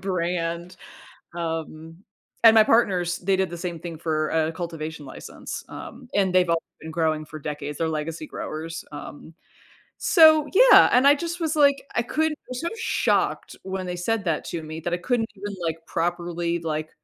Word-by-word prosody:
brand, 175 -1 -2 0.6
um, 165 -1 -5 0.5
and 225 -1 +9
my 220 - +8
partners, 180 -7 +2
they 190 +1 +1
did 190 -2 0
the 175 - -7
same 170 -1 -5
thing 170 -1 -7
for 155 -1 -1
a 160 0 +1
cultivation 160 -3 -6
license, 130 - -8
um, 250 - -10
and 190 -2 +2
they've 180 -2 +4
all 165 0 +2 0.2
been 160 0 -8
growing 155 -2 0
for 155 +1 -9
decades, 150 0 -5
they're 165 - 0
legacy 155 0 -4
growers, 165 +1 -6
um 145 +2 -9 0.7
so 315 -3 +6
yeah, - - +8
and 250 +3 +5
I 285 - +8
just 340 +3 -5
was, 315 -1 0
like 280 -1 +4
I 235 - +1
couldn't 310 +4 -1
was 255 +1 -5
so 335 - -1
shocked 460 - 0
when 190 -1 -4
they 180 0 -4
said 215 +4 -1
that 165 -4 -1
to 165 -2 -5
me 155 +1 -7
that 175 +2 -3
I - - +1
couldn't 225 +3 -1
even, 205 +1 -6
like, 165 -1 -2
properly, 170 0 -2
like 155 -1 -3
175 Hz, 180 wpm, -24 LUFS, 160-205 Hz, 0.7 s, and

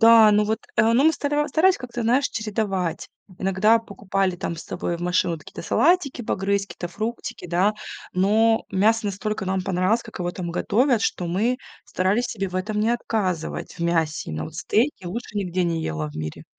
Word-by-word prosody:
Да, 225 -1 +8
ну 210 0 +4
вот, 220 +1 -1 0.2
э, 225 +1 +4
ну, 245 +4 +4
мы 320 - +6
стара 295 0 0
старались 365 +3 +4
как-то, 245 -2 -5
знаешь, 250 +5 +2
чередовать. 205 -5 -2 0.3
Иногда 195 +4 +3
покупали 195 -4 -2
там 175 -1 -3
с 165 - -7
собой 175 -1 -3
в - - -12
машину 175 0 +1
вот 160 - -10
какие-то - - -10
салатики, 315 -7 +2
погрызть 200 -1 0
какие-то 175 - -6
фруктики, 215 -1 -5
да, 180 +5 +3 0.4
но 220 +4 +3
мясо 215 +3 +2
настолько 200 +1 -3
нам 190 0 0
понравилось, 190 +5 +1
как 220 - -10
его 175 0 -1
там 175 -1 -5
готовят, 240 +6 +2
что 180 - -1
мы 210 +9 +1 0.3
старались 200 +7 +1
себе 195 -5 -3
в 180 - -12
этом 210 +3 -2
не 215 +2 +2
отказывать, 205 -8 -2
в 175 - -13
мясе. 165 - 0
Но 80 +1 -3
вот - - -9
стейки 230 -2 0
лучше 215 +4 -6
нигде 185 -2 0
не 165 -1 -1
ела 75 - -3
в 75 - -11
мире. 80 0 -5
200 Hz, 190 wpm, -24 LUFS, 180-230 Hz, 0.4 s, Да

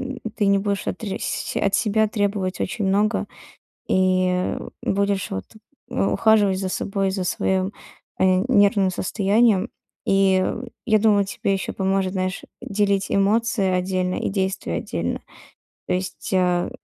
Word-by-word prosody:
м, - - -10 0.2
ты 205 - +1
не 200 0 +4
будешь 200 -1 -2
отресь 195 0 -3
от 200 0 +1
себя 220 0 +2
требовать 200 -3 -1
очень 210 +1 -2
много. 205 +3 +1 0.6
И, 185 0 +2
э, 180 0 -1 0.2
будешь, 200 -1 0
вот, 95 - -4 0.4
э, 95 - 0
ухаживать 195 - +3
за 190 -1 -2
собой, 195 0 -1
за 190 -1 -2
своим, 190 +2 0 0.5
э, - - +4 0.2
нервным 200 -4 +4
состоянием. 205 +3 +2 0.4
И 195 -1 +3 0.4
я 215 -3 +4
думаю, 205 -2 +4
тебе 200 0 -1
ещё 195 - -3
поможет, 190 -1 0
знаешь, 185 -1 -2 0.2
делить 200 -1 0
эмоции 210 +1 +2
отдельно 185 0 0
и - - -2
действия 190 0 -2
отдельно. - - -3 0.7
То - - 0
есть, 185 +3 -4
э, 180 -1 +2
195 Hz, 140 wpm, -22 LUFS, 185-205 Hz, 0.7 s, не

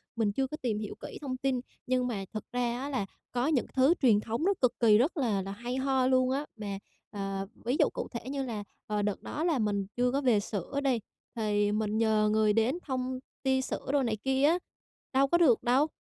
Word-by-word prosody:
mình 220 -3 +1
chưa 265 +5 0
có 305 - -6
tìm 220 -4 -1
hiểu 210 -1 -5
kỹ - - -7
thông 260 -3 -3
tin. 260 -1 0 0.3
Nhưng 255 0 +1
mà 205 -5 -3
thật 215 - -4
ra 245 0 -1
á 275 +2 -4
là 255 -8 -1 0.3
có 245 +3 0
những 295 -6 +2
thứ 265 +5 +5
truyền 230 -6 +5
thống 225 +6 -3
nó 400 - +4
cực 250 - +2
kỳ 215 -3 +6
rất 280 +9 +1
là 225 -8 +1
là 195 +1 -5
hay 240 +5 -4
ho 265 -1 +2
luôn 255 -1 +3
á, 280 +3 -1
mà, 205 -3 -5 0.3
à, 195 -1 -3 0.2
ví 245 +3 +1
dụ - - +5
cụ - - -4
thể 235 +1 -6
như 275 0 -2
là, 225 -5 -4 0.2
ờ, 210 -1 0
đợt 205 -1 -1
đó 305 - -3
là 325 -7 +2
mình 205 -2 0
chưa 245 0 +2
có 275 - 0
về 245 -6 +4
sữa 205 +6 -3
đi, 260 -4 +2 0.4
thì 205 -2 +1
mình 215 0 0
nhờ 215 -1 +3
người 215 -1 +3
đến 225 +8 +2
thông 255 -2 -2 0.2
tia 265 -1 +2
sữa - - -4
đồ 285 -2 +3
này 225 -3 0
kia 265 0 +1
á, 335 +4 +4 0.5
đâu 270 +1 +4
có 345 +5 +3
được 275 -10 +4
đâu. 260 +6 +3
245 Hz, 235 wpm, -30 LUFS, 215-265 Hz, 0.5 s, kỳ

